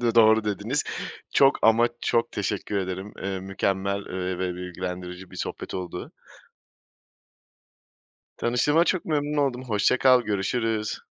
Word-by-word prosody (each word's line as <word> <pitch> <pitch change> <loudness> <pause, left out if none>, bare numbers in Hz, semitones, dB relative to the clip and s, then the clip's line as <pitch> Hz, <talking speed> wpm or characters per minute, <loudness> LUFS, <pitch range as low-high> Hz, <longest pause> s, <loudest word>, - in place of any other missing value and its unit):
Dı 120 -1 +1
doğru 110 -1 +6
dediniz. 105 +7 -1 0.5
Çok 135 0 +6
ama 115 +1 +5
çok 115 - +1
teşekkür 105 0 -2
ederim. 95 +1 -4
Eee, 95 -1 -2
mükemmel, 95 +1 -1
eee, 90 0 -3
ve 90 -1 -1
bilgilendirici 90 0 -6
bir - - -11
sohbet - - -5
oldu. 90 -1 -5 2.2
Tanıştığıma 145 +8 +2
çok 185 - 0
memnun 150 -1 -1
oldum, 130 -3 0
hoşça 110 +2 +2
kal 130 -1 +6
görüşürüz. 110 +1 -1
105 Hz, 125 wpm, -25 LUFS, 95-120 Hz, 2.2 s, doğru